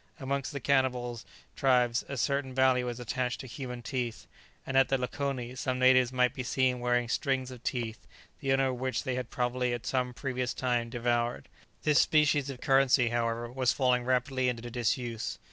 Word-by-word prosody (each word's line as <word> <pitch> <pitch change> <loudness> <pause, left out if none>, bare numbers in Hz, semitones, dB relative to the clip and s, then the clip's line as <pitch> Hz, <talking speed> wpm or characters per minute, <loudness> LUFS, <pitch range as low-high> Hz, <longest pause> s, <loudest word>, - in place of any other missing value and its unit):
Amongst 140 +1 -2
the 140 - -4
cannibal 125 -3 +1 0.4
tribes 125 -3 +2
a 140 - -4
certain 135 +1 -1
value 130 -1 +3
is 120 0 -6
attached 125 +1 -2
to - - -9
human 125 -1 -7
teeth, 125 -3 -3 0.4
and 135 - -4
at 135 0 +5
the 135 - +2
lakoni 125 -1 -3
some 130 -1 -2
natives 130 -1 +5
might 125 -1 +2
be 130 - -4
seen 130 0 +1
wearing 120 0 +1
strings 130 0 -1
of 125 -2 -10
teeth, 115 -4 -3 0.3
the 135 - -1
owners 135 0 +3
of 125 - -5
which 130 -3 -1
they 130 -3 -2
had 125 -2 -3
probably, 125 0 -1
at 120 - -5
some 125 -1 0
previous 125 -2 -2
time, 120 -2 0
devoured. 120 0 -1 0.3
This 150 -3 +5
species 150 -2 +3
of 130 -2 -7
currency, 135 -2 +4
however, 115 0 -1
was 130 -1 +1
falling 125 -3 +2
rapidly 130 +1 +1
into 120 -1 -4
disuse. 120 -1 -2
125 Hz, 180 wpm, -30 LUFS, 120-130 Hz, 0.4 s, at